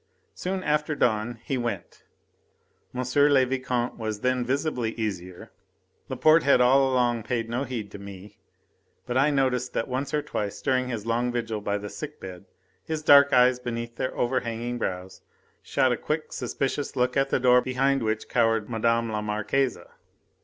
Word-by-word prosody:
Soon 185 +1 -3
after 150 +1 0
dawn 115 -2 0
he 135 - -2
went. 115 -7 -5 0.9
M. 125 0 -3 0.3
le 135 -2 +5
Vicomte 125 -2 -2
was 110 -2 -4
then 125 0 +1
visibly 125 -3 -1
easier. 90 -5 -5 0.6
Laporte 155 +1 +4
had 140 -3 +4
all 135 +2 +4
along 120 -2 +1
paid 115 0 -2
no 120 +4 -2
heed 115 -6 -5
to 100 - -9
me, 100 +1 -11 0.7
but 120 - -4
I 135 +3 +4
noticed 130 -3 0
that 115 - -1
once 130 +2 -3
or 150 -1 0
twice 105 -8 -4
during 130 -2 0
his 115 -4 -4
long 120 +2 0
vigil 115 -3 -3
by 100 0 -1
the 105 0 -6
sick 150 +7 -8
bed 90 -2 -9 0.4
his 155 -1 -4
dark 140 -1 +7
eyes 125 -1 +5
beneath 115 -1 -5
their 130 - -3
overhanging 120 -1 -2
brows 95 -3 -4 0.4
shot 130 - +1
a 120 - 0
quick 155 +5 -3
suspicious 140 +1 -3
look 125 0 +1
at 135 0 +2
the - - +1
door 125 0 +5
behind 135 +2 +1
which 110 -1 -2
cowered 115 -2 +1
Mme. 115 0 +1
la 105 -1 -2
Marquise. 110 +5 0
125 Hz, 165 wpm, -26 LUFS, 110-135 Hz, 0.9 s, dark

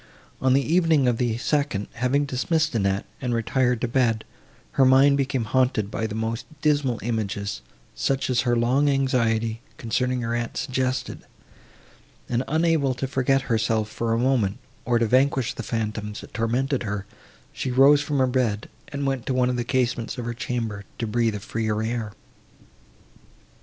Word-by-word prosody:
On 130 -1 +3
the 135 +1 +3
evening 160 -4 +3
of 120 -2 +2
the 120 -3 0
second, 140 -6 0
having 125 +4 +1
dismissed 155 +4 0
Annette, 100 -3 0 0.2
and 125 -2 -1
retired 125 +1 +1
to - - +1
bed, 115 -3 +1 0.5
her 135 - +3
mind 135 +2 +6
became 135 -3 0
haunted 110 -3 +1
by 110 - -2
the 105 - -6
most 115 +1 -3
dismal 145 -5 +1
images, 105 -3 -2 0.3
such 135 - 0
as 125 -2 +2
her 120 -1 +1
long 130 +5 +2
anxiety, 115 -5 +1 0.2
concerning 125 +2 -1
her 115 0 -2
aunt, 120 -1 -3
suggested; 130 0 -2 1.1
and, 125 +1 0
unable 160 -4 +2
to 125 - -3
forget 135 0 +2
herself, 110 -3 0
for 115 +1 -2
a 115 - +2
moment, 120 -6 +1 0.3
or 120 0 +2
to 115 - +2
vanquish 130 +1 +2
the - - -6
phantoms, 105 -2 -3
that - - -13
tormented 125 +5 0
her, 105 -3 -3 0.5
she 130 - -3
rose 135 +3 +6
from 145 -1 -2
her 130 - +4
bed, 125 -5 0 0.2
and 140 -1 -4
went 135 -3 -2
to 130 - 0
one 125 0 +2
of - - -2
the 120 - -1
casements 120 -1 -1
of 120 - -4
her 120 - -2
chamber, 115 -4 -3
to 115 - -2
breathe 115 0 0
a - - -4
freer 110 +1 -2
air. 115 -2 -2
125 Hz, 170 wpm, -24 LUFS, 115-135 Hz, 1.1 s, mind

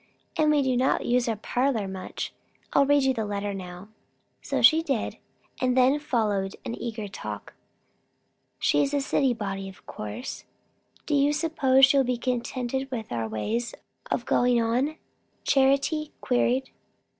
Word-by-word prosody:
And 310 -3 +3
we 295 -2 +4
do 260 -1 +1
not 255 +2 +1
use 240 0 +2
our 225 - 0
parlour 240 0 0
much. 190 -1 -5 0.4
I'll 280 -1 +4
read 285 -1 +4
you 265 0 +3
the 225 -3 -2
letter 205 -1 -3
now." 185 +1 -8 0.5
So - - -2
she 320 +1 +7
did; 275 -9 -2 0.4
and 255 0 +2
then 260 +3 +4
followed 210 -8 -1
an - - -3
eager 225 -3 -4
talk. 195 - -7 1.0
"She - - +2
is 280 0 0
a 285 - +2
city 270 -2 +1
body, 195 -3 -4
of 190 - -16
course. 105 - -6 0.6
Do 300 - -2
you 285 0 +4
suppose 290 -4 +4
she 275 +1 +2
will 270 - +5
be 250 -1 -1
contented 255 +2 -2
with 230 -4 -5
our 115 -2 -2
ways 225 - -2 0.3
of - - -1
going 245 -1 +3
on?" 245 +7 +1 0.5
Charity 280 +3 +2
queried. 255 +1 +1
250 Hz, 155 wpm, -26 LUFS, 215-275 Hz, 1.0 s, she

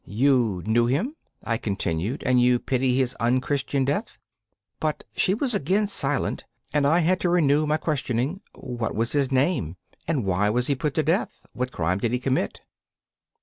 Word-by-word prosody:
'You 115 -5 +1
knew 120 +2 +3
him?' 185 - 0 0.3
I 115 -1 -1
continued, 100 - -2
'and 125 -1 +3
you 125 0 +4
pity 130 0 0
his 130 -2 +1
unchristian 130 +3 0
death?' 140 +2 -2 0.6
But 155 -1 -2
she 190 - +2
was 250 +2 -1
again 200 +4 +1
silent, 145 -8 -1 0.3
and 145 -1 +3
I 165 +4 +4
had 180 +3 +2
to 180 - 0
renew 155 -3 +3
my 155 +1 +2
questioning: 140 - -2
'What 120 -4 -4
was 115 +2 0
his 140 -2 +1
name, 130 - +1 0.3
and 145 -9 0
why 95 +2 +1
was 120 +3 +1
he 140 - +2
put 140 +1 -2
to 155 - +2
death? 170 +7 +1 0.2
What 125 +1 -3
crime 90 +3 -1
did 115 +3 -1
he 125 - +1
commit? 130 +1 -1
130 Hz, 175 wpm, -25 LUFS, 120-150 Hz, 0.6 s, you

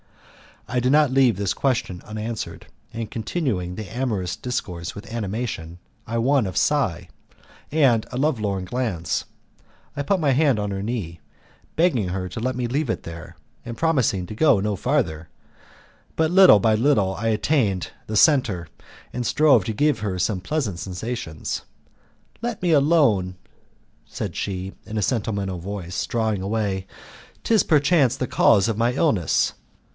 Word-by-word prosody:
I 125 +2 0
did 125 +1 +1
not 150 -2 +4
leave 130 -4 +4
this 100 0 -1
question 125 -10 -1
unanswered, 110 +1 -5 0.3
and 115 -2 -5
continuing 110 - -2
the 110 -1 -7
amorous 110 -8 -2
discourse 90 -9 -4
with 110 +3 -10
animation 105 -6 -4 0.3
I 115 +1 -2
won 130 -1 +2
a 95 - -6
sigh 140 - +1 0.6
and 135 -8 +3
a 125 - -4
lovelorn 105 -10 0
glance. 100 -6 -2 0.7
I 145 - -2
put 185 +7 +1
my 150 -4 +2
hand 140 -2 +3
on 105 -1 -2
her 95 0 -3
knee, 100 -7 -4 0.6
begging 155 - +2
her 90 0 -3
to 90 - -6
let 130 +2 -1
me 125 -1 -2
leave 140 +2 -1
it - - -2
there, 85 0 -9 0.3
and 115 -1 -6
promising 130 - +1
to - - -7
go 125 -1 +4
no 105 +1 -1
farther, 80 -3 -1 0.9
but 160 0 +1
little 185 - +8
by 110 +2 +3
little 110 -5 +2
I 115 +4 -3
attained 110 - +1 0.2
the 110 - -4
center, 105 - +3 0.5
and 125 0 -3
strove 135 -9 +4
to 110 - -2
give 150 +6 +2
her 100 -3 -2
some 90 +2 0
pleasant 105 - -2
sensations. 90 -3 -5 0.8
"Let 235 -3 -3
me 175 - +2
alone," 140 - +3 0.7
said - - -5
she, 95 -1 -3
in 110 - -5
a 105 - +1
sentimental 100 -6 -1
voice, 90 -1 -4
drawing 110 -4 -1
away, 100 -2 -2 0.6
"'tis 220 -3 +4
perchance 145 -4 +3
the 130 - -2
cause 105 -4 +4
of 110 -2 -1
my 120 +2 +2
illness." 110 - +1
110 Hz, 155 wpm, -23 LUFS, 95-135 Hz, 0.9 s, little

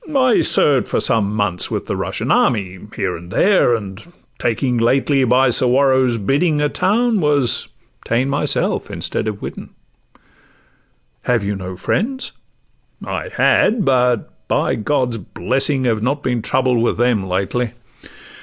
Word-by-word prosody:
'—'I 260 -6 +2
served 140 -4 +3
for - - 0
some 105 -3 +2
Months 100 -4 -1
with - - -3
the - - -3
Russian - - -3
army 95 -5 +1 0.2
here 95 -3 -2
and 85 +1 -9
there, 185 - +3
And 100 -2 -7 0.4
taking 120 +1 0
lately, 135 +3 +2
by 125 +1 +3
Suwarrow's 130 0 +3
bidding, 145 - +1
A 150 0 +1
town, 225 +6 +1
was 145 -5 +1 0.4
ta'en 120 +3 0
myself 140 +1 -1
instead - - -3
of 105 -2 -5
Widdin.' - - -7 1.5
'Have 120 -3 0
you 100 +1 -2
no 95 -1 -7
friends?'—'I 245 - -5
had—but, 130 - +1
by - - 0
God's 125 0 -1
blessing, 130 - -1
Have 115 -4 0
not 140 +5 -1
been 125 -2 -1
troubled 125 0 +1
with 120 - 0
them 120 -3 +2
lately. 100 +6 -2
125 Hz, 135 wpm, -18 LUFS, 110-140 Hz, 1.5 s, served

